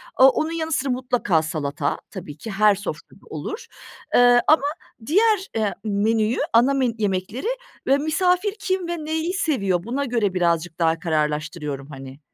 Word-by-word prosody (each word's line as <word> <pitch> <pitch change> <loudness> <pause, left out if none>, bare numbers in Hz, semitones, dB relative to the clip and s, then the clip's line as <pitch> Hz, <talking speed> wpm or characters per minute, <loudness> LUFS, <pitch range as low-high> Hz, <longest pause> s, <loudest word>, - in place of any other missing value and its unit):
Aaa, 260 - +8
onun 310 +4 -1
yanı 325 -1 -3
sıra 275 -2 0
mutlaka 250 -9 +1
salata 155 -1 -2
tabii 155 -7 -8
ki 220 - -7
her 210 +1 +4
sofrada 205 +2 -8
olur, 455 +3 -6 0.5
eee, 245 0 +6
ama 310 -2 +5 0.4
diğer, 405 - +3
eee, 215 -2 0
menüyü 215 +2 +1 0.2
ana 245 +4 +5
men 255 -4 +1
yemekleri 205 - -2 0.4
ve 275 +1 +5
misafir 360 +6 +1
kim 375 -3 -1
ve 345 0 -2
neyi 320 +3 -1
seviyor 200 - 0
buna 260 +7 -2
göre 230 -6 0
birazcık 170 -2 0
daha 165 -1 +2
kararlaştırıyorum 150 -3 -2
hani. 135 -1 -10
225 Hz, 150 wpm, -23 LUFS, -, 0.5 s, Aaa